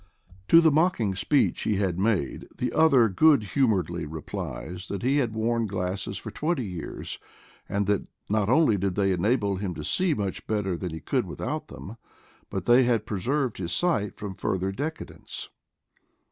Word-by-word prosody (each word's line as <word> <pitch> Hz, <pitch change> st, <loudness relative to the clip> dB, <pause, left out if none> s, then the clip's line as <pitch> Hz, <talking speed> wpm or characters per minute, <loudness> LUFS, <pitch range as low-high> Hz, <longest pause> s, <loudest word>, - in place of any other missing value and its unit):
To 165 Hz, -, +8 dB
the 160 Hz, -2 st, +5 dB
mocking 145 Hz, -, +2 dB
speech 95 Hz, +10 st, +1 dB
he 105 Hz, -, 0 dB
had 95 Hz, -3 st, 0 dB
made 100 Hz, -9 st, 0 dB
the -, -, -2 dB
other 140 Hz, -8 st, +5 dB
good 140 Hz, +5 st, +4 dB
humoredly 95 Hz, -, +1 dB
replied 80 Hz, +2 st, -6 dB
that 100 Hz, -2 st, -4 dB
he 135 Hz, +3 st, +2 dB
had 120 Hz, -6 st, 0 dB
worn 115 Hz, +1 st, 0 dB
glasses 95 Hz, 0 st, -3 dB
for 110 Hz, -, -7 dB
twenty 150 Hz, +2 st, -1 dB
years, 90 Hz, -5 st, -6 dB, 0.5 s
that 100 Hz, 0 st, 0 dB, 0.2 s
not 105 Hz, 0 st, +1 dB
only 130 Hz, -5 st, +4 dB
did 95 Hz, -1 st, -1 dB
they 100 Hz, -1 st, +2 dB
enable 100 Hz, +2 st, +1 dB
him 95 Hz, -3 st, -3 dB
to 75 Hz, -, -6 dB
see 180 Hz, -, +2 dB
much 100 Hz, -3 st, -4 dB
better 105 Hz, -4 st, 0 dB
than 90 Hz, +1 st, -4 dB
he 80 Hz, -, -7 dB
could -, -, -1 dB
without -, -, -4 dB
them, 110 Hz, +5 st, -9 dB, 0.5 s
but -, -, -4 dB
they 120 Hz, +2 st, +6 dB
had 120 Hz, -4 st, +2 dB
preserved 120 Hz, +4 st, -1 dB
his 85 Hz, -2 st, -3 dB
sight 110 Hz, -, 0 dB
from 105 Hz, -2 st, -5 dB
fur 95 Hz, 0 st, -1 dB
ther 95 Hz, +1 st, -2 dB
decadence. 150 Hz, +10 st, -6 dB
105 Hz, 170 wpm, -26 LUFS, 95-125 Hz, 0.5 s, To